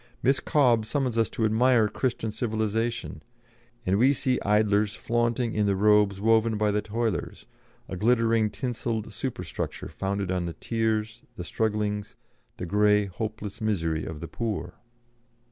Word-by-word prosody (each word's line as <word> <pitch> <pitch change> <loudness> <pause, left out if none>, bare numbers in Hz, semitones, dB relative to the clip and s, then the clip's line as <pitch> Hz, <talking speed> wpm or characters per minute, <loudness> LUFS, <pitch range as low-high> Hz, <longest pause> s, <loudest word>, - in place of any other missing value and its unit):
Miss 135 +2 +3
Cobbe 125 -7 +3
summons 130 +1 -1
us 115 -3 +2
to 110 - -1
admire 115 +1 +4
Christian 115 -1 -2
civilisation, 110 +1 -2 0.6
and 95 +2 +2
we 130 +4 +5
see 130 -1 0
idlers 105 0 +2
flaunting 120 +1 0
in 105 -1 +1
the 100 - +2
robes 105 -1 +3
woven 110 +1 +3
by 105 0 +2
the 105 +1 0
toilers, 110 -2 -3 0.4
a - - -5
glittering 115 +1 +2
tinselled 115 -3 -3
super 120 +4 -4
structure - - -5
founded 100 -1 -3
on 90 -2 -1
the 85 - -4
tears, 110 +1 -2
the 90 - -6
strugglings, 105 +1 -2 0.4
the 90 - -4
grey, 105 +2 +3
hopeless 105 +2 -6
misery 85 -7 0
of 80 -2 -7
the 85 - -5
poor." 115 +1 -4
110 Hz, 145 wpm, -26 LUFS, 105-115 Hz, 0.6 s, we